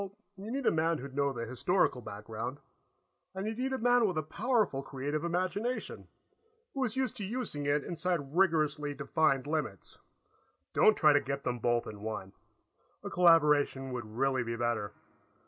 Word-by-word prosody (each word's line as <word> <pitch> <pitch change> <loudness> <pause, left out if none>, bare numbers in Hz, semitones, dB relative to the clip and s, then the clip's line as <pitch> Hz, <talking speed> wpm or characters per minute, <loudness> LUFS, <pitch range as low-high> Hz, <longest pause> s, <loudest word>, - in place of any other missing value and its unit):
"Well, 200 0 -7 0.2
you 195 +3 -8
need 270 +2 -3
a - - +5
man 165 +1 +1
who'd 135 -1 -8
know 140 0 +2
the 115 -3 -4
historical 130 - +1
background, 110 +5 -6 0.8
and 190 +1 -3
you'd 220 +2 -3
need 265 +1 -1
a 265 - 0
man 245 -1 +4
with 180 -4 -2
a 155 - 0
powerful 215 - 0
creative 145 +3 -3
imagination, 185 +8 -2 0.7
who 270 - -1
is 240 -2 -1
used 265 -1 -1
to 210 - -4
using 195 - -3
it 145 0 +2
inside 165 -4 -2
rigorously 155 -5 +2
defined 140 -1 +1
limits. 150 - -4 0.7
Don't 215 - +5
try 150 -1 +6
to 145 - +4
get 140 0 -4
them 125 -1 -2
both 120 0 +1
in 105 -1 -8
one; 105 -3 -5 0.7
a - - -5
collaboration 150 -6 +4
would 115 -3 -6
really 135 -1 +2
be 115 -1 -3
better. 115 -3 -1
150 Hz, 170 wpm, -31 LUFS, 130-190 Hz, 0.8 s, try